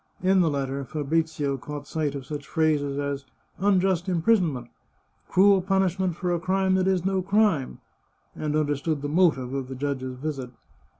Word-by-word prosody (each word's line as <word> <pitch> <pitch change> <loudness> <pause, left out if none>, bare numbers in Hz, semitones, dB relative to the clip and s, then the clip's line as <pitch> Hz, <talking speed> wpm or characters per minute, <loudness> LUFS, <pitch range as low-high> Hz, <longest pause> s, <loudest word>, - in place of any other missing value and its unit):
In 190 0 +4
the 165 - +3
letter 140 -1 -2
Fabrizio 150 0 -1
caught 145 +2 -7
sight 150 -3 -2
of 135 -2 -6
such 145 0 -6
phrases 150 -4 +1
as 140 -1 -2 0.2
" - - -40
unjust 185 -2 +2
imprison 180 0 +3
ment," 120 -3 -7 0.3
" - - -41
cruel 195 +1 +5
punishment 190 -1 +1
for 175 0 -1
a 170 - 0
crime 190 +2 +1
that 185 0 +2
is 185 -2 +1
no 190 -1 +1
crime," 195 -7 +1 0.6
and 150 -1 -2
understood 145 0 0
the - - -1
motive 145 -6 +2
of 135 -2 -3
the 130 - -6
judge's 130 -1 -3
visit. 135 -2 -4
155 Hz, 175 wpm, -25 LUFS, 140-185 Hz, 0.6 s, cruel